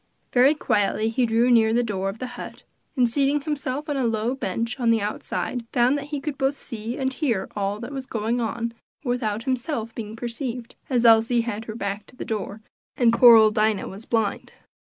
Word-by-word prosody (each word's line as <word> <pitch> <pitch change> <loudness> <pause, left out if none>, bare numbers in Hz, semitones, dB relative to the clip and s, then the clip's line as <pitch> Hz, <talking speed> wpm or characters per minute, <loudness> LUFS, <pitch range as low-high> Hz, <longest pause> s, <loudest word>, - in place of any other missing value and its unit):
Very 260 +4 +5
quietly 215 -4 +1
he 240 +2 +1
drew 230 +2 +3
near 225 -2 +5
the 245 - +3
door 195 -4 -2
of 195 - -6
the 255 - -5
hut, 245 - -9 0.3
and 250 -1 +4
seating 280 +4 +1
himself 290 -1 -3
on 290 -2 -1
a 265 - 0
low 225 +2 0
bench 230 0 -3
on 235 -2 +2
the 230 -1 +4
outside, 215 +3 -3
found 250 +2 +3
that 285 -1 -3
he 295 0 -4
could 280 0 -5
both 270 +1 +1
see 230 0 -6
and 265 -1 -1
hear 240 -10 -1
all 200 0 -2
that 240 +3 -6
was 270 -2 -6
going 230 +2 -1
on 230 +1 -2 0.3
without 230 -4 -1
himself 245 -3 -2
being 220 -1 -6
perceived, 240 0 -5 0.2
as 245 -3 +2
Elsie 230 +1 +5
had 225 -1 -4
her 215 - -6
back 200 -1 -4
to - - -17
the - - -6
door, 215 -1 -4 0.4
and 235 -2 +4
poor 235 -1 +9
old 220 -1 +6
Dinah 215 -2 +1
was 200 +4 -9
blind. 225 -3 -1
235 Hz, 205 wpm, -24 LUFS, 220-255 Hz, 0.4 s, poor